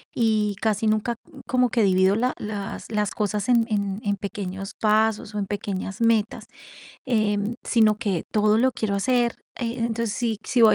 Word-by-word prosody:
y 215 -3 +1
casi 220 0 +1
nunca 215 +2 +1 0.3
como 250 -1 +2
que 230 -1 +2
divido 190 0 +4
la 250 +3 +1
las 205 0 -6
las 210 -2 0
cosas 210 0 -2
en 235 -2 +4
en 200 -1 -1
en 205 -1 0
pequeños 195 -1 -5
pasos 215 0 +2
o - - -1
en 200 - -1
pequeñas 195 0 -4
metas, 225 -2 +1 0.6
eh, 215 -4 +1 0.3
sino 220 -3 +4
que 200 -8 -1
todo 210 0 +3
lo 260 +3 +4
quiero 215 -3 -2
hacer, 240 +3 +1 0.2
eh, 235 0 -2
entonces, 230 -1 -1
si 230 -4 -1
si 245 - +2
voy 220 - +7
215 Hz, 175 wpm, -24 LUFS, 205-230 Hz, 0.6 s, voy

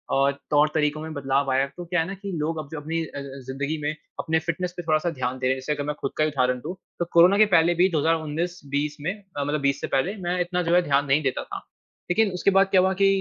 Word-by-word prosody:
और 135 +1 +4 0.2
तौर-तरीकों 150 0 +2
में 160 0 -6
बदलाव 140 -1 0
आया 130 +1 +3
है 140 - 0
तो 175 - -6
क्या 175 0 0
है 160 - -2
ना 195 - -4
कि 195 +1 -7
लोग 160 +2 -1
अब 140 - -7
जो 160 - -4
अपनी 160 +3 -2
अ - - -10
अ, - - -5 0.3
ज़िंदगी 140 +4 -2
में 145 +1 0 0.3
अपने 160 0 +1
फ़िटनेस 170 +2 -3
पे 175 - -4
थोड़ा-सा 160 +2 +1
ध्यान 130 -4 -3
दे 130 - -2
रहे 130 - +3
हैं। - - -4
जैसे 150 +3 -2
अगर 145 0 -3
मैं 150 - -2
ख़ुद 135 - -2
का 155 - +3
ही 155 - +2
उदाहरण 125 -3 +1
दूँ 180 - -5 0.2
तो 175 - +1
कोरोना 180 +4 +7
के 215 - +7
पहले 165 +1 +5
भी 180 +3 +4
2019-20 155 -2 -1
में 170 +6 -1 0.2
अ, 145 - 0
मतलब 145 +1 -1
20 140 0 +1
से - - -2
पहले 155 +10 0
मैं 180 +1 0
इतना 180 0 -1
जो 170 +1 +2
है 180 - +6
ध्यान 140 -1 +2
नहीं 140 +2 +3
देता 135 - -1
था। - - -8 0.4
लेकिन 215 +1 +3
उसके 180 +2 +2
बाद 195 0 +6
क्या 190 - +6
हुआ 190 +1 +2
की 195 - +6
155 Hz, 275 wpm, -25 LUFS, 140-175 Hz, 0.4 s, कोरोना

